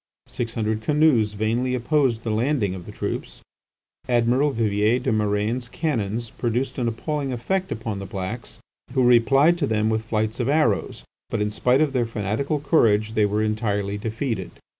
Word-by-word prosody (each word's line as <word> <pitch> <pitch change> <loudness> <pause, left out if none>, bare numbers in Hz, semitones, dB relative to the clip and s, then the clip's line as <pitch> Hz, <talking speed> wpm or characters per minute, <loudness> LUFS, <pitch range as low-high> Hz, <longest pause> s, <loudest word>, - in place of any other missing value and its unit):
Six 115 -1 -5
hundred 110 -1 -1
canoes 140 -6 +3
vainly 115 +5 0
opposed 125 -2 +1
the 110 - -2
landing 110 -3 +1
of 90 -2 -8
the - - -7
troops. - - -5 0.7
Admiral 120 +4 +3
Vivier 110 -1 +1
des 125 - -1
Murènes' 110 +3 0
cannons 115 - -2
produced 120 +3 -2
an 120 - 0
appalling 140 +4 -2
effect 185 +10 -2
upon 110 -3 -4
the 100 - -6
blacks, 100 +4 -6 0.4
who 130 - +2
replied 135 +8 +5
to 145 - +1
them 110 -1 +1
with 110 0 0
flights 110 +1 -1
of 125 +1 0
arrows, 140 -9 +1 0.3
but 115 - -2
in 105 0 0
spite 125 +6 +2
of 150 -3 +1
their 120 -3 +1
fanatical 115 +7 -2
courage 110 -8 +2
they 105 -2 +3
were 105 +1 0
entirely 105 -2 -1
defeated. 110 -2 -3
115 Hz, 165 wpm, -23 LUFS, 105-130 Hz, 0.7 s, replied